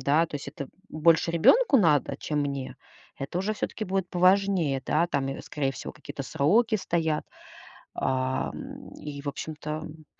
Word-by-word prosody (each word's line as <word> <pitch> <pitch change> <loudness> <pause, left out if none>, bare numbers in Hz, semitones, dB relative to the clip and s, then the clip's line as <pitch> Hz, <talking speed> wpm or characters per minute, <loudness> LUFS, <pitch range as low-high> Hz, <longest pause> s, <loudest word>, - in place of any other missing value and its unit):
да, 145 +5 +3
то 155 - -11
есть 140 - -7
это, 140 0 -6
м, - - -16 0.2
больше 165 +1 +3
ребенку 300 - +5
надо, 150 -7 +3
чем 150 -1 -2
мне. 140 -2 -3 0.4
Это 140 +6 -3
уже 205 +4 -1
все-таки 215 - -3
будет 190 -1 -1
поважнее. 180 -6 +3
Да, 170 - +3
там 135 -4 0
и, 135 - -4
скорее 135 -3 -2
всего, - - -7
какие-то 140 - -7
сроки 205 - +3
стоят. 160 -5 0 0.7
Ам, 130 0 -2
и, 145 -1 -7
в 145 - -7
общем-то, 150 +2 -5
м, 155 0 -7
155 Hz, 165 wpm, -27 LUFS, 140-180 Hz, 0.7 s, ребенку